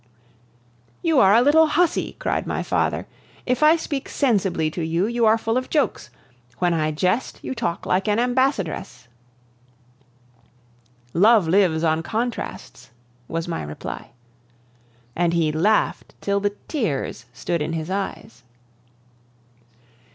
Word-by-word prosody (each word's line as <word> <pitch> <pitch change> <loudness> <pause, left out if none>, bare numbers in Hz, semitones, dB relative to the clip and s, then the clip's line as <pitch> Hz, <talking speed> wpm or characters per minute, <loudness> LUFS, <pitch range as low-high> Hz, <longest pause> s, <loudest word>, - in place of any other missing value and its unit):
"You 325 -4 +3
are 195 -3 +6
a 235 - +5
little 315 +3 +5
hussy," 340 +3 +1
cried - - -2
my - - -2
father. - - 0 0.4
"If 250 +1 0
I 305 +2 +7
speak 295 -4 -4
sensibly 190 - +1
to 170 - -5
you, 165 +4 0
you 235 0 +1
are 220 +1 +5
full 225 +1 -1
of 255 - -3
jokes; 295 -3 0 0.5
when 175 +4 +1
I 155 -2 0
jest, 185 +10 -1
you - - -3
talk 230 -8 -3
like 190 +3 0
an 210 0 +2
ambassadress." 235 - -1 2.1
"Love 210 0 +5
lives 170 -3 +3
on 160 0 +2
contrasts," 220 - -5 0.4
was 165 +1 -3
my 170 - -3
reply. 75 -5 -7 1.1
And 170 -1 +1
he 165 -2 +2
laughed 195 +8 0
till 200 0 0
the 205 0 -1
tears 170 - -2
stood 170 +6 -3
in 155 +2 -2
his 160 +2 -4
eyes. 190 -11 -5
195 Hz, 130 wpm, -22 LUFS, 165-245 Hz, 2.1 s, I